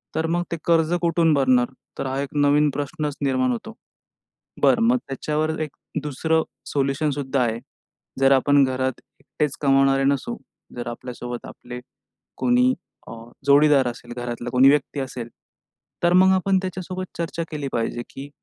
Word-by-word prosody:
तर 160 Hz, -, 0 dB
मग 175 Hz, +1 st, 0 dB
ते 170 Hz, -, -1 dB
कर्ज 165 Hz, 0 st, +3 dB
कुठून 170 Hz, -2 st, +3 dB
भरणार? 130 Hz, -3 st, +3 dB, 0.3 s
तर -, -, -3 dB
हां, 130 Hz, +1 st, -2 dB
एक 140 Hz, -, -4 dB
नवीन 145 Hz, +1 st, +4 dB
प्रश्नच 145 Hz, 0 st, -3 dB
निर्माण 130 Hz, -2 st, +1 dB
होतो. 125 Hz, -, -5 dB, 0.9 s
बरं, 230 Hz, -, +4 dB
मग 250 Hz, -, +4 dB
त्याच्यावर 155 Hz, +3 st, -2 dB
एक 155 Hz, -, -2 dB, 0.3 s
2रं 160 Hz, +3 st, 0 dB, 0.2 s
सोल्युशन 140 Hz, +2 st, 0 dB
सुद्धा 135 Hz, -1 st, -1 dB
आहे. 115 Hz, 0 st, -1 dB, 0.6 s
जर 135 Hz, 0 st, +5 dB
आपण 140 Hz, +1 st, +5 dB
घरात 130 Hz, 0 st, 0 dB, 0.3 s
एकटेच 150 Hz, -2 st, -3 dB
कमावणारे 135 Hz, -1 st, +3 dB
नसू, 140 Hz, -, 0 dB, 0.4 s
जर 120 Hz, -1 st, -5 dB
आपल्यासोबत 120 Hz, 0 st, -6 dB
आपले 125 Hz, 0 st, -9 dB, 0.6 s
कोणी 250 Hz, +1 st, +3 dB, 0.4 s
अ, -, -, -8 dB, 0.3 s
जोडीदार 145 Hz, -1 st, +5 dB
असेल, 120 Hz, 0 st, -8 dB
घरातला 120 Hz, -1 st, -5 dB
कोणी 130 Hz, +2 st, +6 dB
व्यक्ती 145 Hz, 0 st, +1 dB
असेल, 125 Hz, -3 st, -5 dB, 0.7 s
तर 175 Hz, 0 st, +4 dB
मग 190 Hz, +1 st, +6 dB
आपण 190 Hz, +1 st, +2 dB
त्याच्यासोबत 185 Hz, 0 st, -4 dB
चर्चा 170 Hz, 0 st, -3 dB
केली 150 Hz, -3 st, -4 dB
पाहिजे, 120 Hz, +1 st, -2 dB
की 140 Hz, +1 st, -8 dB
140 Hz, 150 wpm, -23 LUFS, 130-160 Hz, 0.9 s, कोणी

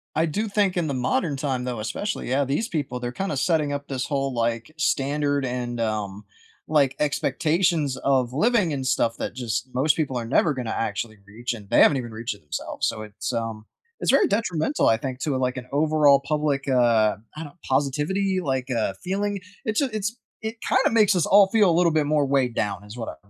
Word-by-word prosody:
I 160 Hz, -, +3 dB
do 210 Hz, +8 st, -2 dB
think 200 Hz, -2 st, +1 dB
in 170 Hz, -3 st, 0 dB
the 140 Hz, -, -2 dB
modern 135 Hz, +4 st, 0 dB
time, 135 Hz, -3 st, -2 dB
though, 125 Hz, -2 st, -3 dB
especially, 120 Hz, -, -3 dB
yeah, 135 Hz, +3 st, +2 dB
these 140 Hz, -, -1 dB
people, 145 Hz, -, -3 dB
they're 120 Hz, 0 st, -4 dB
kinda 190 Hz, -1 st, -2 dB
setting 155 Hz, 0 st, +1 dB
up 145 Hz, 0 st, -4 dB
this 130 Hz, -2 st, -3 dB
whole, 135 Hz, -2 st, -1 dB
like, 115 Hz, +2 st, -1 dB
standard 145 Hz, -1 st, 0 dB
and, 125 Hz, -1 st, -3 dB
um, 105 Hz, -2 st, -3 dB, 0.4 s
like, 140 Hz, -4 st, +2 dB
expectations 150 Hz, +1 st, +1 dB
of 130 Hz, -3 st, +1 dB
living 200 Hz, -, +2 dB
and 135 Hz, -2 st, -3 dB
stuff 115 Hz, -3 st, +1 dB
that -, -, -4 dB
just 120 Hz, 0 st, -3 dB
most 145 Hz, +5 st, +2 dB
people 140 Hz, -5 st, -1 dB
are 120 Hz, -, -3 dB
never 140 Hz, +5 st, +2 dB
gonna 125 Hz, -4 st, -4 dB
actually 110 Hz, 0 st, -3 dB
reach, 120 Hz, +5 st, -5 dB
and 105 Hz, -4 st, -10 dB
they -, -, +4 dB
haven't 145 Hz, -, +6 dB
even 120 Hz, -3 st, -5 dB
reached 110 Hz, -1 st, -4 dB
it -, -, -19 dB
themselves. 75 Hz, -, -3 dB
So, 110 Hz, -, -3 dB
it's, 105 Hz, -1 st, -5 dB
um 115 Hz, -2 st, -3 dB, 0.3 s
It's -, -, -1 dB
very 410 Hz, -, +5 dB
detrimental, 205 Hz, -, 0 dB
I 115 Hz, -, +4 dB
think, 130 Hz, +2 st, -5 dB
to, 145 Hz, -4 st, 0 dB
like, 125 Hz, 0 st, -1 dB
an 125 Hz, -1 st, -7 dB
overall 150 Hz, -1 st, +4 dB
public, 150 Hz, -2 st, 0 dB
uh 120 Hz, -5 st, +3 dB, 0.2 s
I 160 Hz, -, -4 dB
don't 155 Hz, +2 st, -13 dB
positivity, 150 Hz, +9 st, 0 dB
like, 130 Hz, -3 st, -2 dB
uh, 115 Hz, -5 st, 0 dB
feeling. 200 Hz, +2 st, -1 dB, 0.3 s
It's 215 Hz, -2 st, 0 dB
j 280 Hz, -, +1 dB
it's 215 Hz, +2 st, -2 dB, 0.2 s
It 220 Hz, +1 st, -5 dB
kind 260 Hz, -, +3 dB
of -, -, 0 dB
makes 210 Hz, -3 st, +4 dB
us 175 Hz, -, +2 dB
all 200 Hz, 0 st, +7 dB
feel 210 Hz, -2 st, +4 dB
a 165 Hz, -, +2 dB
little 175 Hz, -1 st, +4 dB
bit 155 Hz, -1 st, +2 dB
more 150 Hz, -1 st, +2 dB
weighed 135 Hz, -3 st, +1 dB
down 105 Hz, -1 st, -2 dB
is 105 Hz, +4 st, -11 dB
what 115 Hz, -, -4 dB
I'm 100 Hz, -, -27 dB
140 Hz, 215 wpm, -24 LUFS, 120-160 Hz, 0.4 s, all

